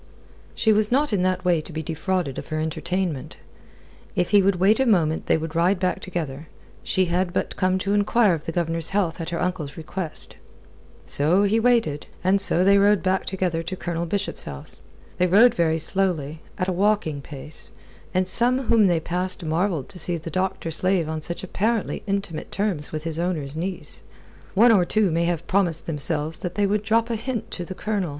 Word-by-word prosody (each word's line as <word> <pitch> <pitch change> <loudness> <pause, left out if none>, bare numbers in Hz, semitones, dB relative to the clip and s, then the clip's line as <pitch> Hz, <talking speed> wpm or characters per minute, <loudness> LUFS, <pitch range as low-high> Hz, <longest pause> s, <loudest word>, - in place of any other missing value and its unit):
She 220 - +3
was 215 +1 +2
not 280 -1 +2
in 195 - +2
that 185 0 0
way 175 -3 +3
to 160 - -11
be 160 0 -4
defrauded 165 -1 -2
of - - -9
her 155 - -3
entertainment. 160 -1 -2 0.8
If 180 - 0
he 205 -1 +6
would 195 0 +2
wait 195 +6 +3
a 265 - +2
moment 165 -7 +2
they - - +4
would 160 0 -5
ride 175 +4 +3
back 185 0 0
together. 155 -5 -5 0.4
She 185 - +1
had 175 +1 0
but - - -2
come 185 0 +1
to 195 +2 -1
enquire 205 0 +3
of 155 -2 -4
the - - -3
Governor's 165 -1 -1
health 180 -4 -1
at 165 - -4
her 170 -1 -3
uncle's 175 -6 -3
request. 165 +1 -6 0.7
So 165 +8 +3
he 210 +3 +2
waited, 225 -12 +1 0.2
and 190 +2 +3
so 180 -2 +5
they 200 +1 +5
rode 205 0 +4
back 190 0 0
together 180 -3 -1
to 175 +3 -5
Colonel 170 -2 -3
Bishop's 200 +3 -2
house. 70 -2 -7 0.4
They 180 - +4
rode 220 +7 +6
very 160 -2 +1
slowly, 160 -4 -1 0.2
at 185 - -1
a - - +1
walking 190 -6 +1
pace, 145 +2 -8 0.4
and 185 0 +1
some 240 +6 +1
whom 225 -3 +5
they 175 -2 +2
passed 180 +2 -2
marvelled 160 -2 0
to 190 -3 -6
see 175 +1 -1
the 165 +1 -7
doctor 185 -1 -2
slave 185 0 +3
on 160 0 -3
such 170 +4 -4
apparently 215 +4 -1
intimate 195 -5 -3
terms 195 -8 -2
with 155 -1 -4
his 165 -1 -4
owner's 155 -5 -2
niece. 180 +3 -5 0.5
One 230 +4 +6
or 200 -5 +5
two 205 +1 +1
may 170 +1 +1
have 170 -1 -1
promised 175 -4 +1
themselves 155 0 -1
that 180 -1 -5
they 205 - +2
would 205 +1 +1
drop 225 +2 +1
a - - 0
hint 235 0 -4
to 180 - -4
the 185 - -7
Colonel. 205 -5 -2
180 Hz, 200 wpm, -24 LUFS, 160-200 Hz, 0.8 s, he